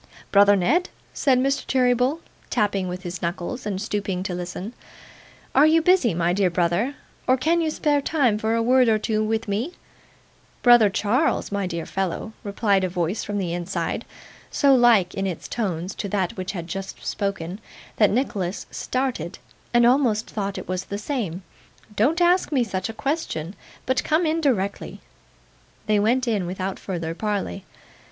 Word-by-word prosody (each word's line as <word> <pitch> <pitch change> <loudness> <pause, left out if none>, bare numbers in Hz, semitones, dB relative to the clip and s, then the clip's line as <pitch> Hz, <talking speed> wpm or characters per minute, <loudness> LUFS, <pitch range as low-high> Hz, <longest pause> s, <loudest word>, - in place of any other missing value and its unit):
'Brother 205 0 +6
Ned,' 270 - +2 0.2
said 265 -3 +3
Mr. 275 +2 +1
Cheeryble, 255 +4 +2 0.3
tapping 205 -5 0
with 180 +1 -5
his 175 -1 -6
knuckles, 180 +8 -3
and 195 -2 -2
stooping 200 -3 -2
to 185 - -3
listen, 180 +5 -5 0.8
'are 290 +3 +6
you 320 +1 +5
busy, 325 - +3
my 170 +1 +1
dear 190 -1 +2
brother, 175 +10 0 0.3
or 255 - +4
can 330 +6 +2
you 320 - +1
spare 295 -2 +1
time 265 -8 +1
for 220 +1 0
a 230 - +1
word 250 0 +4
or 220 - +4
two 215 0 0
with 220 +1 -1
me?' 220 - -2 0.9
'Brother 240 -4 +7
Charles, 220 +10 0
my 200 -2 -1
dear 170 -2 -4
fellow,' 195 +4 -3
replied 200 -1 +1
a 185 - 0
voice 175 +3 -2
from 205 0 -3
the 180 -4 -2
inside, 175 +2 -3 0.5
so 280 -2 +4
like 235 -8 +5
in 195 0 -2
its 180 -4 -5
tones 185 -5 -3
to 200 - -5
that 190 -3 -1
which 185 +1 -4
had 170 -4 -5
just 195 +3 -7
spoken, 195 -2 -3 0.4
that 210 -3 +5
Nicholas 205 -6 -1
started, 255 - -3 0.3
and 240 0 +5
almost 240 -4 +3
thought 200 -2 -3
it - - -7
was 185 0 -3
the 200 - -4
same, 205 - -3 0.5
'don't 275 - +2
ask 355 0 +3
me 265 -4 +3
such 190 -2 -3
a - - -5
question, 220 - -3 0.3
but 260 0 +1
come 315 +3 +2
in 320 +1 +1
directly.' 200 -9 -1 0.9
They 215 -1 +2
went 245 +5 +2
in, 205 -6 0
without 185 +1 -4
further 165 -4 -4
parley. 200 0 -3
210 Hz, 170 wpm, -23 LUFS, 185-255 Hz, 0.9 s, Brother